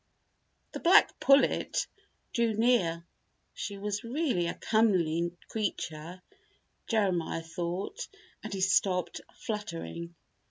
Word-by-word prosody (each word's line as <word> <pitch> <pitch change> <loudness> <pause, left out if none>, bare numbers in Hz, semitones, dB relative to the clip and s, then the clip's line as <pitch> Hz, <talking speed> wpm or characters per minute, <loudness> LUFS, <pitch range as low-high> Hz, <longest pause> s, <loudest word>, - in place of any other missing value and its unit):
The - - -5
black 350 +1 +5
pullet 275 0 +3 0.5
drew 230 -2 +1
near. 205 -8 +2 0.5
She 200 - -5
was 205 0 -3
really 240 - 0
a - - -3
comely 175 -7 +2 0.2
creature, 180 -5 -4 0.6
Jeremiah 185 -7 0
thought, 175 - -4 0.4
and - - -6
he 195 -1 -3
stopped 185 -1 +2
fluttering. 170 -5 -5
190 Hz, 95 wpm, -30 LUFS, 170-220 Hz, 0.6 s, black